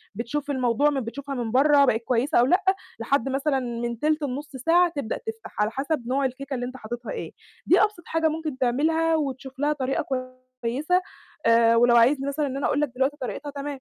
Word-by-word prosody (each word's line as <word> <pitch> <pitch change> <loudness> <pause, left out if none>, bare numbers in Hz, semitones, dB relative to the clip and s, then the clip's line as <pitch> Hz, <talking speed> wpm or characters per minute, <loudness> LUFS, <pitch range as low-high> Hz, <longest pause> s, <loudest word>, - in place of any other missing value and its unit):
بتشوف 285 +6 -3
الموضوع 260 +2 +2
م 280 -2 -1
بتشوفها 275 +4 -6
من 235 -3 -3
برّا 280 +3 +5
بقت 225 -3 +1
كويسة 250 +6 +1
أو 245 - +5
لأ، 365 +8 +3 0.4
لحد 270 +2 0
مثلًا 270 +1 0
من 235 -1 -4
تِلت 305 0 +1
لنص 285 +2 -4
ساعة 340 +7 +3
تبدأ 265 -6 -3
تفتح، 450 -1 -8
على 210 +2 +1
حسب 270 -1 -2
نوع 270 +2 +1
الكيكة 270 +2 -4
اللي 245 -1 -2
أنت 255 +1 -7
حاططّها 240 +1 -6
إيه، - - -5 0.3
دي - - +5
أبسط 420 -5 0
حاجة 325 0 +1
ممكن 310 -3 -3
تعملها 320 +6 +2
وتشوف 270 -2 -4
لها 295 +1 +2
طريقة 270 -2 -1 0.6
كويسة 295 +10 +1 0.4
آآ 230 0 +5
ولو 240 +1 +5
عايزني 265 +4 +4
مثلًا 290 +1 -1
إن 270 0 -4
أنا 275 - -2
أقول 290 - +1
لك 295 - 0
دلوقتي 270 +3 0
طريقتها، 280 +3 -5
تمام. 280 0 -6
275 Hz, 200 wpm, -25 LUFS, 245-295 Hz, 0.6 s, برّا